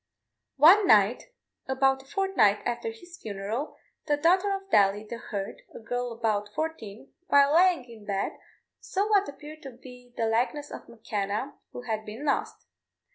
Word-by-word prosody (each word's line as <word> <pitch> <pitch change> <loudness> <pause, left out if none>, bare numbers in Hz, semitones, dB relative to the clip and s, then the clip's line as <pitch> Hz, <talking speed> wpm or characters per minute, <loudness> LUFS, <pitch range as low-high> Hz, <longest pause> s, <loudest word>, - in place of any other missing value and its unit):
One 365 +8 +7
night, 210 +3 +4 0.4
about 265 0 +2
a 270 - -22
fortnight 385 - +2
after 240 -1 -2
his 350 +11 -12
funeral, 215 +7 -5 0.3
the 295 -1 +2
daughter 365 +6 +3
of 390 0 -8
Daly, 205 +1 +3
the 235 +2 -6
herd, 200 -4 -6
a - - -7
girl 245 +2 -3
about 215 -3 -1
fourteen, 275 -8 -5
while 280 -2 +5
lying 345 -4 +4
in 230 -4 -14
bed 200 -2 -1 0.5
saw 400 +2 -2
what 405 -4 +3
appeared 300 +2 -11
to 275 - -8
be 250 0 -14
the 225 - 0
likeness 250 +6 -1
of - - -9
M'Kenna, 220 +2 -3 0.2
who 245 - -8
had 220 -3 -3
been 220 +7 -8
lost. 280 - -2
245 Hz, 160 wpm, -27 LUFS, 220-300 Hz, 0.5 s, One